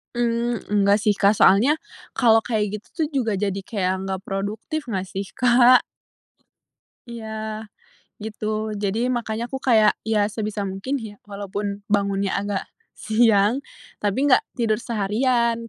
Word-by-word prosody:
Mmm, 235 Hz, -2 st, 0 dB, 0.2 s
nggak 200 Hz, +1 st, +5 dB
sih 205 Hz, -1 st, +2 dB
Kak, 200 Hz, +1 st, +4 dB
soalnya 215 Hz, +8 st, +5 dB, 0.4 s
kalau 230 Hz, -3 st, +5 dB
kayak 210 Hz, -3 st, -1 dB
gitu 210 Hz, -, -18 dB
tuh, 310 Hz, -, +2 dB
juga 255 Hz, -7 st, -1 dB
jadi 195 Hz, 0 st, -1 dB
kayak 185 Hz, -5 st, -1 dB
nggak 190 Hz, -1 st, -3 dB
produktif, 205 Hz, +11 st, -4 dB
nggak 190 Hz, -5 st, -3 dB
sih 195 Hz, +2 st, -4 dB
Kak? 245 Hz, +1 st, +5 dB, 1.2 s
Iya, 235 Hz, -2 st, -7 dB, 1.0 s
gitu. 220 Hz, 0 st, -7 dB, 0.3 s
Jadi, 210 Hz, +4 st, -1 dB
makanya 230 Hz, -3 st, -2 dB
aku 265 Hz, -, -4 dB
kayak, 215 Hz, -3 st, +5 dB
ya 210 Hz, -2 st, +1 dB
sebisa 215 Hz, -1 st, -3 dB
mungkin 195 Hz, +9 st, -4 dB
ya, 215 Hz, -2 st, -8 dB
walaupun 200 Hz, 0 st, -5 dB
bangunnya 200 Hz, -1 st, 0 dB
agak 200 Hz, -1 st, -2 dB, 0.3 s
siang, 220 Hz, +1 st, +3 dB, 0.4 s
tapi 205 Hz, +3 st, -1 dB
nggak 255 Hz, -, +6 dB, 0.2 s
tidur 225 Hz, -3 st, +1 dB
seharian 235 Hz, +1 st, 0 dB
215 Hz, 135 wpm, -23 LUFS, 200-235 Hz, 1.2 s, nggak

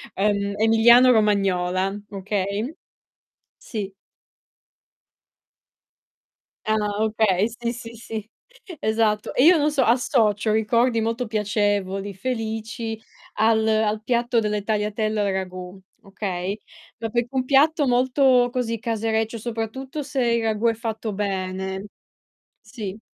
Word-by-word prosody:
ehm, 200 Hz, 0 st, 0 dB
emiliano-romagnola, 210 Hz, -5 st, +4 dB
okay? 200 Hz, -, -3 dB, 0.8 s
Sì. 200 Hz, -4 st, -6 dB, 2.8 s
Ah 220 Hz, 0 st, +2 dB
no, 210 Hz, -1 st, 0 dB, 0.2 s
okay, 210 Hz, -2 st, +2 dB
sì, 235 Hz, 0 st, -4 dB
sì, 230 Hz, -1 st, -9 dB
sì, 220 Hz, -1 st, -7 dB, 0.5 s
esatto, 220 Hz, -1 st, 0 dB
e 255 Hz, -, +4 dB
io 350 Hz, +3 st, +8 dB
non 300 Hz, 0 st, +2 dB
so, 275 Hz, -3 st, +2 dB
associo 225 Hz, -3 st, +2 dB
ricordi 230 Hz, +2 st, +2 dB
molto 230 Hz, +2 st, -1 dB
piacevoli, 205 Hz, -2 st, -1 dB
felici, 225 Hz, 0 st, -4 dB, 0.3 s
al 220 Hz, 0 st, +2 dB
al 215 Hz, 0 st, +1 dB
piatto 240 Hz, 0 st, +1 dB
delle 210 Hz, -2 st, -1 dB
tagliatelle 215 Hz, 0 st, -1 dB
al 200 Hz, -1 st, +1 dB
ragù, 185 Hz, 0 st, -5 dB, 0.2 s
okay. 195 Hz, 0 st, -4 dB, 0.4 s
No 225 Hz, -1 st, -5 dB
perch 240 Hz, +1 st, 0 dB
un 260 Hz, -1 st, 0 dB
piatto 290 Hz, +2 st, +4 dB
molto, 250 Hz, 0 st, +3 dB
così, 230 Hz, -3 st, -2 dB
casereccio 225 Hz, 0 st, -1 dB
soprattutto 235 Hz, +6 st, -5 dB
se 275 Hz, -2 st, -2 dB
il 235 Hz, -1 st, +2 dB
ragù 220 Hz, +1 st, -1 dB
è 230 Hz, -, +3 dB
fatto 220 Hz, -1 st, -4 dB
bene. 190 Hz, -1 st, -3 dB, 0.8 s
Sì. 210 Hz, -2 st, -7 dB
220 Hz, 110 wpm, -23 LUFS, 205-235 Hz, 2.8 s, io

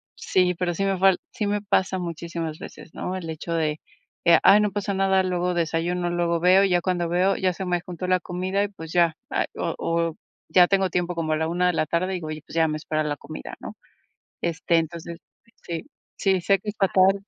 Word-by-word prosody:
sí, 180 Hz, -1 st, +1 dB
pero 175 Hz, 0 st, -1 dB
sí 195 Hz, -, -2 dB
me 195 Hz, -1 st, +1 dB
fal 190 Hz, 0 st, +4 dB
sí 230 Hz, -5 st, -3 dB
me 205 Hz, 0 st, 0 dB
pasa 190 Hz, -2 st, +1 dB
muchísimas 170 Hz, -2 st, -4 dB
veces, 165 Hz, -, -11 dB
¿no?, 185 Hz, -, -3 dB
el 170 Hz, -3 st, -5 dB
hecho 160 Hz, +2 st, -5 dB
de: 155 Hz, -2 st, 0 dB, 0.5 s
"Eh, 170 Hz, -, +7 dB
ay, 205 Hz, +2 st, +7 dB
no 210 Hz, -1 st, +1 dB
pasa 200 Hz, 0 st, -2 dB
nada, 190 Hz, 0 st, +3 dB
luego 180 Hz, -1 st, 0 dB
desayuno, 175 Hz, +1 st, -1 dB
luego 170 Hz, -1 st, 0 dB
veo", 185 Hz, +3 st, +5 dB
y 195 Hz, -, +2 dB
ya 175 Hz, -1 st, +3 dB
cuando 175 Hz, -2 st, 0 dB
veo, 180 Hz, +3 st, +2 dB
ya 185 Hz, -1 st, 0 dB
se 190 Hz, +1 st, -5 dB
me 175 Hz, -1 st, 0 dB
juntó 180 Hz, 0 st, -5 dB
la 185 Hz, 0 st, +3 dB
comida 185 Hz, +3 st, -1 dB
y, 205 Hz, -, 0 dB
pues, 160 Hz, -5 st, -10 dB
ya, 170 Hz, -2 st, +3 dB, 0.4 s
o -, -, -2 dB
o 165 Hz, -1 st, -1 dB, 0.3 s
ya 180 Hz, -1 st, +7 dB
tengo 195 Hz, -1 st, +2 dB
tiempo 180 Hz, -1 st, -1 dB
como 165 Hz, -2 st, -1 dB
a 155 Hz, -, +1 dB
la 160 Hz, -, 0 dB
una 180 Hz, +2 st, +1 dB
de 180 Hz, -, +2 dB
la 155 Hz, -, +1 dB
tarde 185 Hz, +4 st, -1 dB
y, -, -, -3 dB
pues, 155 Hz, -1 st, -5 dB
ya 165 Hz, -1 st, +2 dB
me 155 Hz, -, -2 dB
espera 155 Hz, 0 st, -2 dB
la 150 Hz, -1 st, -2 dB
comida, -, -, -9 dB
¿no?, -, -, -8 dB, 0.7 s
este, 170 Hz, 0 st, +1 dB
entonces, 165 Hz, +1 st, -3 dB, 0.4 s
sí, 165 Hz, -2 st, -5 dB, 0.3 s
sí, 190 Hz, -2 st, +1 dB
sé 195 Hz, +2 st, +3 dB
que 210 Hz, -, -11 dB
es 205 Hz, -, -2 dB
fatal. 195 Hz, 0 st, +3 dB
175 Hz, 220 wpm, -24 LUFS, 165-190 Hz, 0.7 s, Eh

